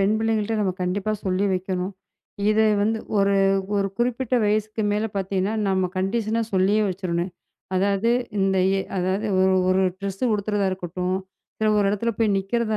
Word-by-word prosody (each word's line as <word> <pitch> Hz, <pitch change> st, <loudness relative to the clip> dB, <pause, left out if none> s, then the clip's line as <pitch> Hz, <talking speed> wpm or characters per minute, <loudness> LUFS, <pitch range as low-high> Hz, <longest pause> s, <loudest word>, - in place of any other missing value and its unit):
பெண் 200 Hz, +2 st, +3 dB
பிள்ளைகள்ட்ட 225 Hz, 0 st, 0 dB
நம்ம 190 Hz, -2 st, +1 dB
கண்டிப்பா 195 Hz, +4 st, -1 dB
சொல்லி 190 Hz, +1 st, +1 dB
வெக்கணும், 185 Hz, +1 st, -2 dB, 0.6 s
இது 220 Hz, +1 st, +3 dB, 0.2 s
வந்து 220 Hz, +1 st, +1 dB, 0.2 s
1 200 Hz, 0 st, +3 dB, 0.6 s
குறிப்பிட்ட 250 Hz, +1 st, 0 dB
வயசுக்கு 215 Hz, +1 st, 0 dB
மேல 210 Hz, +1 st, 0 dB
பாத்தீங்கன்னா 195 Hz, +2 st, -1 dB
நாம 190 Hz, -2 st, +1 dB
கண்டிஷனா 220 Hz, +3 st, 0 dB
சொல்லியே 195 Hz, +3 st, +3 dB
வெச்சுரணும். 180 Hz, -1 st, -2 dB, 0.5 s
அதாவது 200 Hz, +4 st, +2 dB, 1.6 s
1 190 Hz, +1 st, +3 dB, 0.2 s
ட்ரெஸ் 195 Hz, +1 st, -5 dB
உடுத்துறதா 205 Hz, -1 st, 0 dB
இருக்கட்டும், 180 Hz, 0 st, -3 dB, 0.4 s
சில 215 Hz, 0 st, +1 dB
ஒரு 200 Hz, -, +3 dB
இடத்துல 230 Hz, +3 st, -1 dB
போய் 225 Hz, -2 st, +3 dB
நிக்கிறதா 220 Hz, +2 st, -1 dB
200 Hz, 125 wpm, -23 LUFS, 190-215 Hz, 1.6 s, பெண்